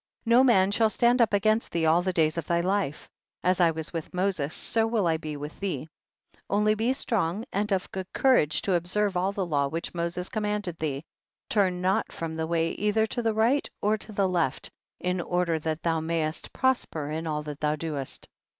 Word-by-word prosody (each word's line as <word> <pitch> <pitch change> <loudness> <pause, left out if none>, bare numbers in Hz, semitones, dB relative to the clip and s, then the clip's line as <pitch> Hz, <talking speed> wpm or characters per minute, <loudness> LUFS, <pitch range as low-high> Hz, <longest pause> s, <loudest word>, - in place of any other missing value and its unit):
4. 230 - -5
No 245 +2 +7
man 200 -7 +4
shall 220 +1 +3
stand 240 +4 +3
up 225 - +4
against 215 +2 +2
thee 165 -1 0
all 160 +2 +4
the 185 +1 0
days 160 -3 +2
of 170 -2 -4
thy 170 0 +2
life; 185 -4 -1 0.4
as 185 0 +2
I 170 - +6
was 160 0 -5
with 165 +1 -5
Moses, 180 -6 0
so 225 +5 0
will 225 -4 +1
I 165 -1 +2
be 155 -2 -6
with 150 +2 -8
thee, 190 -5 -3 0.6
only 210 +1 +3
be 225 +4 +1
strong 215 -6 -1
and 205 +2 -1
of 190 -1 0
good 190 -1 -6
courage 160 - +3
to 195 - +1
observe 185 +3 +1
all 185 +2 +1
the 200 -2 -2
law 145 -4 +1
which 165 +4 -4
Moses 170 +1 -3
commanded 210 -5 -2
thee, 145 -2 -2 0.5
turn 185 -4 +1
not 190 +4 +1
from 165 -1 -5
the 160 0 -2
way 165 0 +1
either 210 +1 +1
to 240 +2 -3
the 225 -2 0
right 235 +6 +2
or 210 +1 +2
to 215 0 -8
the 200 -2 +1
left, 170 -8 -1 0.3
in 180 0 -1
order 175 -2 0
that 155 0 -3
thou 165 -1 +1
mayst 160 -1 -2
prosper 165 - 0
in 160 +1 -3
all 150 -1 -2
that 150 -1 -7
thou 150 0 +1
doest. 150 -4 -5
180 Hz, 210 wpm, -27 LUFS, 160-210 Hz, 0.6 s, No